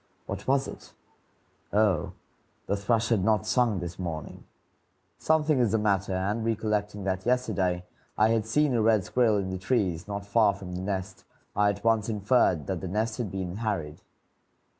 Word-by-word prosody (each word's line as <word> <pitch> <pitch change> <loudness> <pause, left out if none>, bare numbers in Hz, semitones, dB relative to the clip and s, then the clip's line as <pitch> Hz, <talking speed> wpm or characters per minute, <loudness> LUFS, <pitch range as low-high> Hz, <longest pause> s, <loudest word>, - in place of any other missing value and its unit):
What - - -6
was 135 0 +2
it? - - -11 0.8
Oh, 100 -6 +2 0.5
the 100 - 0
thrush 115 +3 0
had 110 -6 +2
not 110 0 +2
sung 115 -2 +2
this 90 +1 -6
morning. 80 -5 -6 0.7
Something 155 -3 +2
is 115 -4 +2
the - - +4
matter; 100 -3 +1
and, 100 +5 -1
recollecting 105 -2 -1
that 95 -1 -2
yesterday 95 -8 0 0.3
I 110 +1 +4
had 110 -1 +1
seen 150 +4 +2
a 115 - +2
red 110 -2 +3
squirrel 115 0 +2
in 95 -2 -2
the 95 - -4
trees 95 -5 0
not 100 -1 -4
far 100 -1 +3
from 90 -1 -8
the 90 - -4
nest, 95 0 -4 0.3
I 105 0 +4
at 100 0 -4
once 115 -1 +2
inferred 105 - +2
that 95 -3 -3
the 95 - -4
nest 110 +5 -2
had 115 -5 -2
been 95 0 -4
harried. 100 -10 -3
105 Hz, 175 wpm, -27 LUFS, 95-115 Hz, 0.8 s, the